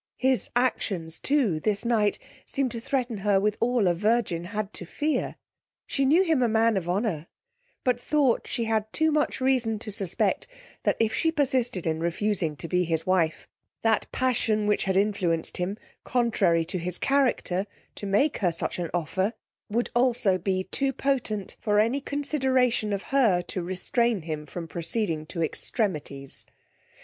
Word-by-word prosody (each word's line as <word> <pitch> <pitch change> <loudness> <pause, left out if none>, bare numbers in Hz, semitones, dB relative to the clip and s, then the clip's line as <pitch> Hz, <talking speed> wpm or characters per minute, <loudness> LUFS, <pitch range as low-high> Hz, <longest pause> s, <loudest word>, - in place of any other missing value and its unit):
His 260 -1 +1
actions 190 -9 0
too, 255 - +1
this 205 +6 -1
night, 215 -3 +2 0.3
seem'd 275 -3 +1
to 230 - -4
threaten 245 -2 -1
her 200 -1 +3
with 210 +1 +1
all 235 -4 +2
a 175 - +4
virgin 200 -3 0
had 210 +1 -4
to - - -6
fear. 295 - -1 0.5
She 275 - 0
knew 320 +8 +5
him 320 -7 +2
a 245 - +4
man 225 0 +3
of 175 -3 -2
honour, 180 -5 -1 0.6
but 245 -1 +1
thought 280 -5 +2
she 235 - -2
had 220 -1 -1
too 315 0 +2
much 300 -2 +1
reason 255 -4 +2
to 215 0 -6
suspect 195 - -1 0.4
that - - +2
if 225 -1 +2
she 325 - +2
persisted 255 - 0
in 160 -1 0
refusing 170 -1 0
to 165 - -7
be 180 +1 +2
his 165 -1 -1
wife, 175 -4 +1 0.4
that 225 -1 +1
passion 225 -4 +1
which 210 0 +1
had 190 -1 +1
influenced 195 -5 0
him, 185 +3 -2 0.3
contrary 220 -9 +2
to 180 +2 -2
his 180 +1 -1
character, 250 -8 +1 0.3
to - - -7
make 210 +10 +2
her 180 -4 +2
such 165 - -3
an 170 -2 -2
offer, 185 +6 0 0.4
would 235 +3 -1
also 240 -6 +3
be 185 +1 0
too 270 +8 -1
potent 250 -8 -2
for 210 -1 +2
any 235 +6 +2
consideration 260 -6 +1
of 200 -1 -2
her 215 -10 +4
to 180 - -4
restrain 190 +4 0
him 155 -2 -5
from 170 +1 -6
proceeding 165 -2 -1
to 165 0 -2
extremities. 150 - -2
210 Hz, 165 wpm, -26 LUFS, 180-245 Hz, 0.6 s, knew